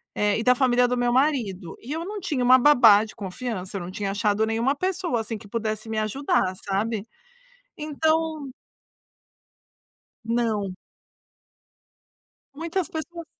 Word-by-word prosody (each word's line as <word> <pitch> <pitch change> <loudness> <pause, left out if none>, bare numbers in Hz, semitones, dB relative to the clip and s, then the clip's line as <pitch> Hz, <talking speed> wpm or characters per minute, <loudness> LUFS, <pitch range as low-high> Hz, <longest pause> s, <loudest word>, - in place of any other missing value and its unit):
eh, 210 +1 +1
e - - -2
da 250 - +5
família 250 -1 +3
do 250 - -1
meu 245 0 +1
marido, 230 - 0
e 255 - -9
eu 325 +1 -3
não 415 +2 -5
tinha 300 -10 -2
uma 255 +1 +7
babá 240 -7 +7
de 220 - -10
confiança, 200 -1 -5
não 175 +1 -7
tinha 195 0 -3
achado 205 +1 +1
nenhuma 230 +5 0
pessoa, 365 -5 -1
assim, 220 0 -5
que 205 - -14
pudesse 215 0 -3
me 220 - -3
ajudar, 215 -4 0
sabe. 205 +2 -1 0.7
Então 310 -2 -1 1.7
Não. 220 -5 -1 1.8
Muitas 335 +2 -2
pessoas 335 +1 -6
240 Hz, 135 wpm, -24 LUFS, 210-295 Hz, 1.8 s, uma